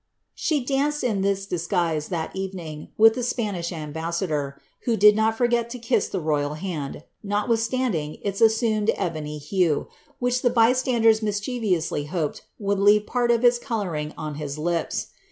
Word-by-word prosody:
She 295 Hz, -6 st, -1 dB
danced 285 Hz, +2 st, 0 dB
in 215 Hz, -6 st, 0 dB
this 195 Hz, 0 st, 0 dB
disguise, 170 Hz, -4 st, -1 dB
that 170 Hz, -2 st, -4 dB
evening, 180 Hz, -6 st, -5 dB
with 225 Hz, +1 st, +7 dB
the 250 Hz, -, -3 dB
Spanish 205 Hz, -8 st, -2 dB
ambassador, 155 Hz, -2 st, -3 dB, 0.3 s
who 230 Hz, -2 st, +1 dB
did 210 Hz, +1 st, +7 dB
not 220 Hz, +1 st, +1 dB
forget 240 Hz, -1 st, +1 dB
to 250 Hz, -, -6 dB
kiss 235 Hz, +1 st, +1 dB
the 190 Hz, -, -2 dB
royal 150 Hz, -2 st, 0 dB
hand, 155 Hz, -4 st, -5 dB, 0.2 s
notwithstanding 220 Hz, -5 st, -1 dB
its 200 Hz, 0 st, -3 dB
assumed 220 Hz, -1 st, +3 dB
ebony 155 Hz, -3 st, -3 dB
hue, 160 Hz, +1 st, 0 dB, 0.3 s
which 245 Hz, 0 st, 0 dB
the 245 Hz, -, +3 dB
by 235 Hz, 0 st, +4 dB
standers 235 Hz, -4 st, +3 dB
mischievously 205 Hz, -, -1 dB
hoped 155 Hz, -1 st, -3 dB, 0.2 s
would 200 Hz, -1 st, -1 dB
leave 205 Hz, +1 st, +5 dB
part 245 Hz, -1 st, 0 dB
of 235 Hz, +1 st, +3 dB
its 240 Hz, 0 st, +5 dB
colouring 180 Hz, -, -3 dB
on 155 Hz, -1 st, -4 dB
his 145 Hz, -1 st, -4 dB
lips.' 170 Hz, +1 st, -2 dB
200 Hz, 155 wpm, -24 LUFS, 160-230 Hz, 0.3 s, with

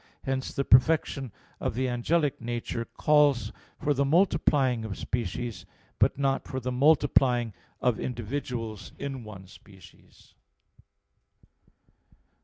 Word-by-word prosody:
3). 135 Hz, -, -2 dB
Hence 130 Hz, 0 st, -2 dB
the 140 Hz, -, -1 dB
perfection 135 Hz, -1 st, +3 dB, 0.3 s
of -, -, -2 dB
the 130 Hz, +1 st, 0 dB
angelic 140 Hz, +5 st, 0 dB
nature 120 Hz, 0 st, -3 dB
calls 145 Hz, -1 st, +2 dB, 0.3 s
for 145 Hz, -, +1 dB
the 140 Hz, 0 st, +1 dB
multiplying 140 Hz, -, +2 dB
of 105 Hz, -3 st, -5 dB
species, 115 Hz, -3 st, -4 dB, 0.4 s
but -, -, +3 dB
not 135 Hz, -1 st, 0 dB
for 130 Hz, -, -3 dB
the 125 Hz, 0 st, -3 dB
multiplying 125 Hz, -4 st, +3 dB, 0.3 s
of 125 Hz, -3 st, +1 dB
individuals 115 Hz, -, -4 dB
in 135 Hz, -3 st, -5 dB
one 100 Hz, -3 st, -10 dB
species. 95 Hz, 0 st, -18 dB
125 Hz, 115 wpm, -28 LUFS, 115-140 Hz, 0.4 s, perfection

